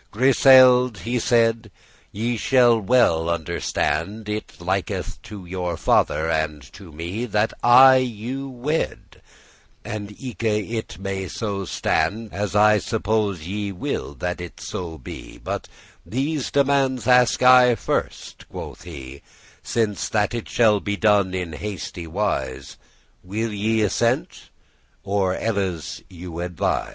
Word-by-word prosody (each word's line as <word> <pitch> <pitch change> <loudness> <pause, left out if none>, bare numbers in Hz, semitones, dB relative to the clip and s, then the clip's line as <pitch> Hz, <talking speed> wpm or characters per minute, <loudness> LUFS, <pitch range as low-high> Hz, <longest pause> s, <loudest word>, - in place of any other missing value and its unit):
*true 130 +5 +3
<6> - - -4
"Griseld'," 125 -3 +7
he 120 +1 -1
said, 115 -2 +2 0.4
"ye 115 +4 -2
shall 120 0 +4
well 90 -7 +3
understand, 85 +5 -2
It 105 0 -5
liketh 95 +2 -3
to 100 -3 -10
your 90 -1 -3
father 80 0 +2
and 80 -3 -1
to 95 -4 -12
me 85 +9 -4
That 105 0 0
I 130 +2 +8
you 130 +2 -3
wed, 135 +6 -4 0.6
and 105 -1 -5
eke 125 -4 -7
it 110 +1 -2
may 95 0 -4
so 100 -1 -4
stand, 110 +4 -1
As 100 0 -3
I 105 0 +5
suppose 105 -5 -1
ye 100 +2 -3
will 90 -5 -4
that 90 +6 -4
it 90 - -9
so 85 -3 -6
be: 65 - -10
But - - -5 0.4
these 140 +3 -2
demandes 135 -3 +1
ask 125 0 +4
I 125 -1 +7
first," - - -4
quoth - - -8
he, 70 -5 -10 0.4
"Since 110 -3 -1
that 105 +1 0
it 120 -2 -5
shall 110 -3 +3
be 100 +1 -3
done 100 -4 +3
in 90 -3 -4
hasty 90 0 -6
wise; 70 -8 -3 0.5
Will 110 +4 -3
ye 110 +2 +1
assent, 95 -10 -1 0.5
or 95 -2 0
elles 95 -7 -3
you 85 -2 -8
advise? 90 -1 -1
105 Hz, 135 wpm, -22 LUFS, 90-120 Hz, 0.6 s, I